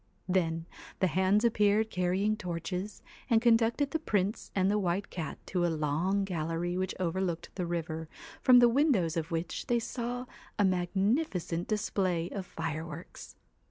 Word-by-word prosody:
Then 165 -3 0 0.3
the 190 - +3
hands 190 +5 +3
appeared 215 -1 +3
carrying 185 +4 +1
torches, 180 +2 -4 0.3
and 230 - +5
conducted 235 +4 +3
the 320 - 0
Prince 205 -7 -1
and 190 -1 +3
the 210 - +2
White 190 +1 -1
Cat 160 -5 -4
to 180 -2 -1
a - - +3
long 160 +6 0
gallery 170 -1 -2
which 185 0 -2
overlooked 175 -1 -2
the 180 -3 -3
river, 160 -2 -3 0.3
from 255 -1 +7
the 245 -1 +8
windows 235 - +2
of 165 -1 -2
which 165 +1 -3
they 240 - +3
saw 245 +1 -3 0.3
a 205 - +4
magnificent 185 - 0
display 185 -5 0
of 195 -3 -5
fireworks. 160 0 -6
185 Hz, 150 wpm, -30 LUFS, 170-215 Hz, 0.3 s, the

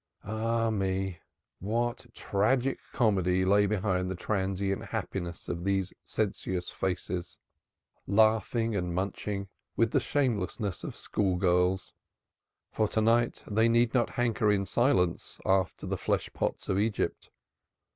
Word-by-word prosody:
Ah, 115 +2 0
me! 95 -3 -1 0.4
what 120 +5 -1
tragic 130 +6 +1
comedy 95 -5 +2
lay 100 +2 +4
behind 95 -3 0
the 95 - -2
transient 95 0 -1
happiness 85 -2 -4
of 85 0 -3
these 95 -1 0
sensuous 95 -4 -2
faces, 90 -1 -3 0.7
laughing 110 +2 +3
and 90 -3 -1
munching 100 +1 -2 0.3
with 115 -1 +2
the - - +3
shamelessness 105 -7 -1
of - - -5
school 95 -3 0
girls! 90 +1 +1 0.8
For 110 - +1
to 110 - -1
night 115 +2 +2
they 110 +2 +2
need 115 0 +3
not 120 -3 +2
hanker 115 -4 +1
in 100 -1 +1
silence 120 -8 +1
after 95 -1 +1
the - - -2
flesh - - -1
pots - - -2
of 95 - +1
Egypt. 105 0 -1
100 Hz, 125 wpm, -29 LUFS, 95-115 Hz, 0.8 s, lay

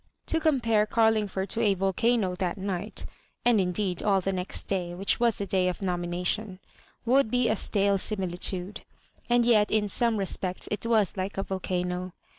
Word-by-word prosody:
To 325 - 0
compare 230 -9 +2
Carlingford 215 -4 +1
to 230 - -1
a 205 -3 +3
volcano 195 +1 +1
that 180 0 -2
night 195 +1 -4 0.4
(and 235 -4 +5
indeed 180 0 -1
all 200 -2 +3
the 195 +1 -2
next 185 -1 -4
day, 175 -3 -2
which 195 +2 0
was 235 -2 +2
the 200 - -2
day 190 -2 +1
of 180 - -2
nomination) 180 +2 -2 0.5
would 255 0 +3
be 245 0 +2
a 220 - +2
stale 200 -1 +1
amilitnde; 185 -1 -2 0.5
and 240 0 +4
yet 215 -3 +4
in 215 -1 +1
some 230 +2 +2
respects 185 -2 -2
it 210 +2 -2
was 215 -5 +2
like 190 +2 -3
a 195 - 0
volcano. 180 -1 -3
195 Hz, 170 wpm, -27 LUFS, 185-220 Hz, 0.5 s, and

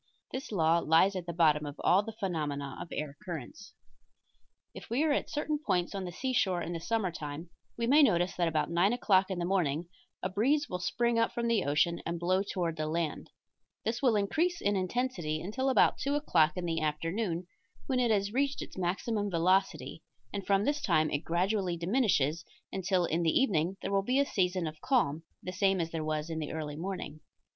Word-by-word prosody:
This 260 -2 -5
law 165 -3 +3
lies 170 +5 +4
at 180 -2 -4
the - - -2
bottom 155 -3 +3
of 145 - -8
all 185 - +5
of 205 - -2
the - - -3
phenomena 150 -9 -3
of - - -6
air 150 -2 -4
currents. 175 - -7 1.0
If - - -10
we 250 +6 +1
are 315 - +2
at 285 - 0
certain 300 0 -1
points 180 - 0
on 195 -2 -3
the 175 - -5
seashore 195 -5 0
in 170 - -4
the 165 - -3
summer 210 +1 -1
time 155 +1 -7 0.3
we 235 - 0
may 285 +6 +6
notice 180 - +3
that 175 -1 +1
about 160 0 0
9 180 +6 +3
o'clock 195 -6 +3
in 190 - -2
the 175 - -1
morning 170 -3 0 0.3
a - - +1
breeze 275 +10 +1
will 180 - -4
spring 235 +5 +1
up 230 - +2
from 235 0 -1
the 230 -4 +2
ocean 150 +4 +1
and 170 0 -3
blow 185 +2 +2
toward 175 -4 -2
the 155 0 -2
land; 160 -1 -2 0.6
this 225 +2 -1
will 250 -5 +4
increase 320 - +1
in 205 0 +1
intensity 185 -5 -1
until 240 +11 -2
about 260 - +4
2 280 +2 0
o'clock 165 - +3
in 180 - -2
the 165 -1 -1
afternoon, 165 +4 -2 0.4
when 260 -2 0
it 245 -2 +2
has 205 -1 +1
reached 280 +2 0
its - - -10
maximum 205 +4 -1
velocity, 185 +2 +1 0.3
and 200 -2 -4
from 200 +1 +3
this 290 0 0
time 155 - +2
it 145 - 0
gradually 180 +1 0
diminishes, 170 - +1 0.3
until 185 -1 +1
in 165 +1 0
the 165 -2 +3
evening 190 - +1
there - - -2
will 195 0 +3
be 250 +7 0
a 280 - +4
season 185 -7 0
of 155 -1 -6
calm, 165 - +1 0.2
the 185 - -5
same 195 0 +2
as 165 -1 -2
there 160 -1 -3
was 155 0 -2
in 160 - -3
the 155 - -4
early 150 -2 -4
morning. 175 -2 -5
185 Hz, 210 wpm, -31 LUFS, 165-220 Hz, 1.0 s, may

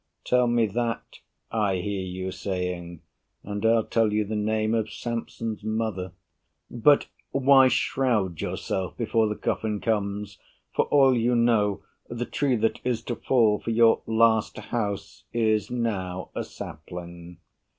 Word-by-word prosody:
Tell 125 -1 +3
me 120 -1 +3
that, 115 +2 -3 0.3
I 105 -4 +1
hear 95 +2 -2
you 95 0 -4
saying, 90 -3 -4 0.4
and 100 0 -5
I'll 115 0 +4
tell 115 -1 +1
you 105 0 +1
the 110 +2 -4
name 110 +1 0
Of 110 -2 0
Samson's 115 -1 -4
mother. 110 -4 -2 0.6
But 140 +5 +4 0.2
why 135 -1 +6
shroud 110 -10 0
yourself 95 -2 -3
Before 115 -1 +1
the 105 - -2
coffin 105 -1 -2
comes? 105 -2 -2 0.3
For - - +2
all 135 -3 +5
you 120 +1 +2
know, 105 -4 +2 0.3
The 120 +1 -3
tree 140 -1 0
that 115 0 0
is 125 -2 -1
to 120 - -3
fall 110 -5 +2
for - - -5
your 115 0 +4
last 110 -1 +3
house 105 -4 -4
Is 110 -3 +1
now 95 -7 -3
a - - -3
sapling. 85 +2 -9
110 Hz, 140 wpm, -26 LUFS, 100-115 Hz, 0.6 s, why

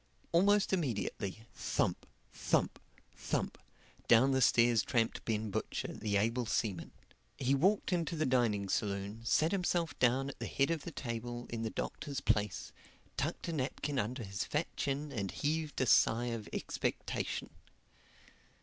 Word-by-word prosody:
Almost 200 +4 +4
immediately, 110 - -2
thump, - - -1 0.3
thump, - - 0 0.4
thump, - - -2 0.5
down 125 +4 +6
the 130 0 +2
stairs 115 -2 +5
tramped 115 0 0
Ben 110 -1 -1
Butcher, - - -3
the 105 -1 0
able 115 +3 +1
seaman. 105 -5 -1 0.5
He 135 0 +1
walked 190 +7 +2
into 170 -1 0
the 155 -1 +1
dining 115 -6 +2
saloon, 100 +2 -2
sat 155 +7 +3
himself 175 -4 0
down 130 +2 +3
at - - -9
the - - -3
head 140 +4 +1
of 160 -4 -2
the 170 - -5
table 120 -2 -4
in 115 -1 -3
the 115 - -1
Doctor's 140 +5 -4
place, 105 -3 0 0.4
tucked - - -2
a - - -2
napkin 140 0 -1
under 120 +3 -2
his 100 -1 -3
fat 150 +3 -2
chin 140 +1 -2
and 100 -4 -2
heaved 155 +4 -2
a 130 - +3
sigh 120 +1 +4
of 110 -3 -6
expectation. - - -2
120 Hz, 150 wpm, -34 LUFS, 110-150 Hz, 0.5 s, down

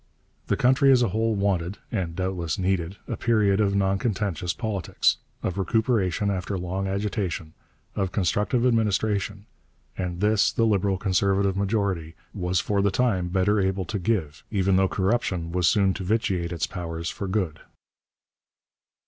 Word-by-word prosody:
The - - +1
country 130 +2 +4
as 125 -2 +5
a 120 - +1
whole 110 0 0
wanted, 100 -1 0
and 85 -3 -2
doubtless 90 -1 -2
needed, 95 -1 -1
a - - -2
period 105 -3 +2
of 100 -1 +1
noncontentious 95 -3 0
politics, 105 -3 0 0.3
of 95 +1 -2
recuperation 105 -2 +1
after 95 +1 -2
long 95 +2 -3
agitation, 95 -5 -2 0.4
of 95 -2 -1
constructive 105 +6 +1
administration, 105 -3 +1 0.5
and 90 -2 -4
this 105 +1 +3
the 115 - 0
Liberal 100 -3 +2
Conservative 95 0 +1
majority 100 -5 -1 0.2
was 90 -3 0
for 100 +2 0
the 100 - +3
time 100 -6 +1
better 95 +3 +2
able 95 -1 0
to 100 +3 -3
give, 90 -7 -1
even 95 -2 +2
though 95 0 +4
corruption 95 -4 0
was 90 -1 +2
soon 100 -1 +3
to 95 - -5
vitiate 95 -4 0
its 80 -3 -1
powers 85 -2 -5
for 100 - -5
good. 95 -6 -1
95 Hz, 150 wpm, -25 LUFS, 90-105 Hz, 0.5 s, as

